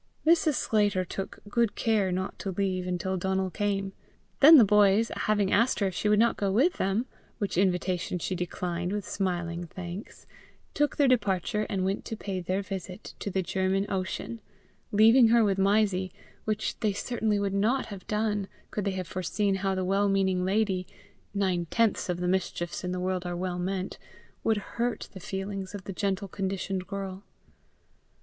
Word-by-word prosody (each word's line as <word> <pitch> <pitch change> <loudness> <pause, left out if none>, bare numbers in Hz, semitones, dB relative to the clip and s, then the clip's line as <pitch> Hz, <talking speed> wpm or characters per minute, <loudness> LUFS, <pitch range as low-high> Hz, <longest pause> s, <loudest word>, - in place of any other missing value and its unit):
Mrs. 320 -2 +4
Sclater 205 -6 +1
took 195 +3 -6
good 230 +1 +1
care 210 -5 +1
not 185 +1 -3
to 195 - -3
leave 185 -1 -1
until 180 +1 -1
Donal 190 +1 -1
came. 195 -1 -1 0.5
Then 310 +3 +10
the 235 - +8
boys, 210 +2 +4
having 205 -2 +1
asked 230 +5 +3
her 200 - +2
if 190 - -1
she 210 - 0
would 210 - +4
not 230 +2 +3
go 200 -1 0
with 270 - +3
them, 195 +6 +1 0.3
which 205 -4 -2
invitation 180 -1 +1
she 180 - -3
declined 180 0 -3
with 205 -1 -3
smiling 175 -3 -2
thanks, 180 +4 -8 0.5
took 295 -1 +1
their 285 - +4
departure 210 -3 +1
and 190 -3 -1
went 195 +1 -1
to 225 - -5
pay 195 -3 -4
their 185 +3 -1
visit 190 -2 -7
to - - -3
the 190 -1 -1
German 190 +2 0
Ocean, 195 +4 -3 0.5
leaving 225 +4 +7
her 230 0 +5
with 195 -2 +1
Mysie 195 -2 +2 0.3
which 215 0 -2
they 215 -2 +1
certainly 215 0 -1
would 200 -1 -1
not 225 +7 +1
have 195 -3 -9
done, 210 -2 0 0.2
could 210 - -2
they 200 - +1
have 185 -2 -4
foreseen 190 +3 -1
how 195 0 0
the 185 -1 -1
well 200 +2 +2
meaning 190 -2 +2
lady 190 -1 0 0.5
nine 185 -4 0
tenths 225 -1 +1
of 175 -1 -1
the 180 - -1
mischiefs 180 -2 -1
in 180 - -2
the 180 - -2
world 185 0 -1
are 175 -1 -3
well 180 0 -2
meant 185 +1 -3 0.4
would 220 -1 +2 0.2
hurt 240 -1 -1
the 190 - -8
feelings 195 +1 -5
of 200 - -7
the 195 - -6
gentle 200 +1 -1
conditioned 190 -1 -3
girl. 195 -1 -5
195 Hz, 180 wpm, -28 LUFS, 185-210 Hz, 0.5 s, Then